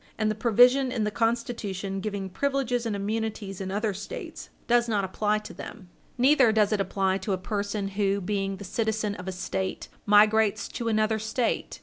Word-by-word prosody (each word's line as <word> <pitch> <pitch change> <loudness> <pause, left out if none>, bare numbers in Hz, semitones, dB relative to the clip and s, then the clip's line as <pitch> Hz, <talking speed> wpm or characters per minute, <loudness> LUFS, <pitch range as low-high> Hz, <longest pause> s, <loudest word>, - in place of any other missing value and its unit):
And 215 0 +1
the - - 0
provision 245 +4 +4
in 230 -4 -1
the 210 - 0
Constitution 220 -4 -2
giving 200 -1 -3
privileges 250 +2 -1
and 215 - -2
immunities 205 -1 -3
in 190 - -4
other 205 +2 -1
States 440 - -7 0.2
does 240 0 +3
not 205 -3 +1
apply 210 +3 0
to 210 - -8
them. 190 -6 -10 0.3
Neither 260 -2 +5
does 215 -1 +3
it 205 - +1
apply 190 0 0
to 195 +1 -2
a - - 0
person 200 +1 -3
who, 200 0 0
being 195 0 -2
the 200 - -9
citizen 220 +1 -1
of 180 -2 -8
a - - -1
State, 190 +1 -4 0.2
migrates 215 +1 +4
to 235 - -4
another 215 0 +1
State. 220 +3 -2
210 Hz, 185 wpm, -27 LUFS, 195-225 Hz, 0.3 s, Neither